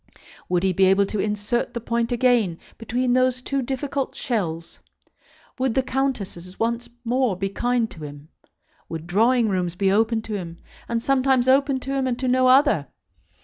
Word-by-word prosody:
Would 180 0 +1
he 190 -1 +2
be 190 +2 +4
able 195 +1 +4
to 210 +1 -4
insert 210 +4 -1
the - - -1
point 235 +1 -1
again 240 -8 +2 0.2
between 245 +2 0
those 255 0 +2
two 275 +2 -2
difficult 270 +2 -3
shells? 170 -9 -3 0.8
Would 260 -3 0
the 265 - +2
Countesses 210 -10 -3
once 235 +1 -1 0.2
more 245 -4 +1
be 195 +1 -2
kind 240 +3 0
to 160 - -10
him? 145 +1 -11 0.6
Would 165 -1 -6
drawing 225 +6 +3
rooms 180 -3 -1
be 195 +1 +1
opened 220 +2 +2
to 220 - -6
him, 170 -4 -5 0.3
and 230 0 -1
sometimes 265 -2 +2
opened 270 0 +3
to 270 - -3
him 270 -1 0
and 245 -2 -1
to 260 0 -2
no 255 0 +3
other? 255 - +4
235 Hz, 175 wpm, -23 LUFS, 195-255 Hz, 0.8 s, be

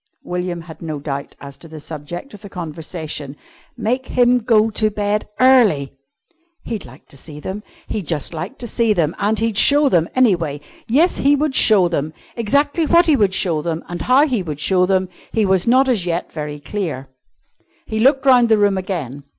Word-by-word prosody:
William 180 -1 -4
had 160 -2 -12
no 155 -3 -5
doubt 140 -1 -5
as 140 -1 -11
to 165 - -12
the 155 -1 -10
subject 160 - -8
of 205 - -12
the 200 - -10
conversation. 155 -4 -6 0.4
Make 245 +3 -2
him 245 0 +3
go 220 -1 +2
to 215 0 +1
bed 210 0 -2
early! 225 - +4 0.7
He'd 225 -4 -5
like 130 +3 -15
to 140 - -13
see 150 +2 -11
them! 190 +7 -6 0.2
He'd 205 -7 -5
just 160 0 -3
like 165 +11 -6
to 240 - -6
see 230 -1 +1
them! 165 -4 0
And 210 +2 +1
he'd 225 -2 -1
show 290 0 +5
them, 170 -7 +2
anyway. 170 - +2 0.3
Yes, 310 +10 +2
he 285 +1 +3
would 295 0 -1
show 205 -8 +5
them. 155 -2 -3 0.2
Exactly 285 +8 +1
what 340 +3 +5
he 310 - +4
would 200 -6 +1
show 165 -6 0
them 165 +1 -3
and 175 0 -6
how 265 +4 +4
he 245 -8 -1
would 155 -5 -6
show 180 +3 +2
them, 190 -1 +1 0.3
he 220 -2 +2
was 190 0 +1
not 260 +3 +4
as 235 -8 +1
yet 170 0 -2
very 150 -1 -6
clear. 145 -3 -5 0.8
He 220 - -3
looked 270 +4 +3
round 250 -3 +5
the 220 - +5
room 205 -2 +2
again. 150 -8 -5
190 Hz, 195 wpm, -19 LUFS, 160-235 Hz, 0.8 s, show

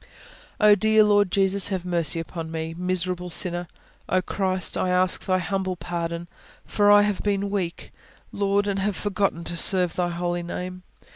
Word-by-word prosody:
"Oh, 210 -1 +7
dear 220 +2 +4
Lord 205 -2 +3
Jesus, 195 +1 +1
have 185 -3 -3
mercy 170 -2 0
upon 165 0 -6
me, 160 0 -4
miserable 180 0 -2
sinner! 175 +1 0 0.4
Oh, 185 - +3
Christ, 185 -1 -1
I 185 - 0
ask 180 0 +1
Thy 185 -1 +1
humble 190 0 -2
pardon! 170 0 -4 0.4
For 205 -1 +2
I 205 0 +7
have 205 -2 -1
been 200 -1 -1
weak, 185 -4 -3 0.4
Lord, 200 0 +1
and 200 -1 -1
have 200 0 -1
forgotten 195 -4 -1
to 170 - -3
serve 180 0 +3
Thy 175 -1 0
Holy 175 0 -2
Name. 180 +1 -6
185 Hz, 165 wpm, -24 LUFS, 175-200 Hz, 0.4 s, Oh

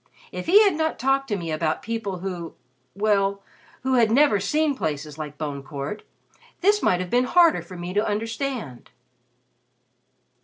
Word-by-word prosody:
If - - -6
he 405 +5 +7
had 400 - +3
not 315 0 -1
talked 270 +2 +1
to 210 - -1
me 165 -3 -5
about 155 0 -1
people 220 -4 -3
who 175 -3 -5 0.4
well, 200 -1 +1 0.4
who 265 0 0
had 235 -3 +4
never 245 -3 +4
seen 300 +9 +1
places 150 - -4
like 150 -1 -6
Bone 145 -3 -4
Court 140 +8 -6 0.6
this 410 +2 +3
might 180 - +2
have 180 - -6
been 245 +1 +3
harder 340 +4 +4
for 185 - -11
me 175 +1 -5
to 205 +2 +2
understand." 220 - -4
210 Hz, 160 wpm, -24 LUFS, 170-270 Hz, 0.6 s, he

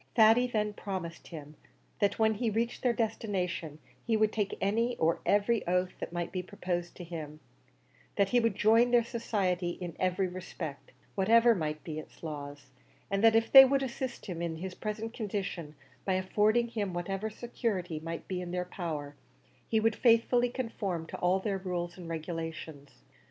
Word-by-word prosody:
Thady 230 +2 +6
then 210 -3 -1
promised 185 -5 -6
him, 150 -2 -9 0.4
that 205 -1 +2
when 220 0 +3
he 225 +2 -1
reached 230 +3 -1
their 250 - +3
destination, 185 -8 -2 0.3
he 225 -2 +1
would 215 0 +3
take 210 -2 -1
any 230 +5 +1
or 165 +1 +2
every 205 +3 +3
oath 180 +1 +1
that - - -5
might 175 -1 -3
be 185 - -2
proposed 180 -2 -4
to 180 - -8
him; 155 -3 -7 0.8
that 200 -1 +2
he 245 - +4
would 230 -4 +1
join 225 +4 +5
their 240 -1 +5
society 200 -7 -1
in 175 -3 -6
every 185 +1 +1
respect, 175 -5 -7 0.2
whatever 230 +4 +5
might 155 -5 -3
be 155 -2 -5
its 155 - -13
laws, 145 -2 -7 0.4
and 195 +1 +1
that 225 0 +7
if 225 0 +2
they 270 -1 +13
would 270 +1 +2
assist 260 0 -4
him 175 -4 -5
in 170 -1 -2
his 185 +3 -5
present 215 +3 -4
condition 195 -8 -4 0.3
by 190 - 0
affording 210 +5 +2
him 205 -6 -3
whatever 195 +4 -2
security 210 -7 -3
might 165 +1 -6
be 185 -1 -3
in 180 - -6
their 180 0 -2
power, 155 -6 -5 0.5
he 220 - +3
would 225 0 +2
faithfully 240 +1 +4
conform 210 -9 -3
to - - -7
all 180 +1 +2
their 195 -1 -2
rules 175 -2 -3
and 175 -3 -9
regulations. 160 - -6
190 Hz, 175 wpm, -31 LUFS, 170-225 Hz, 0.8 s, they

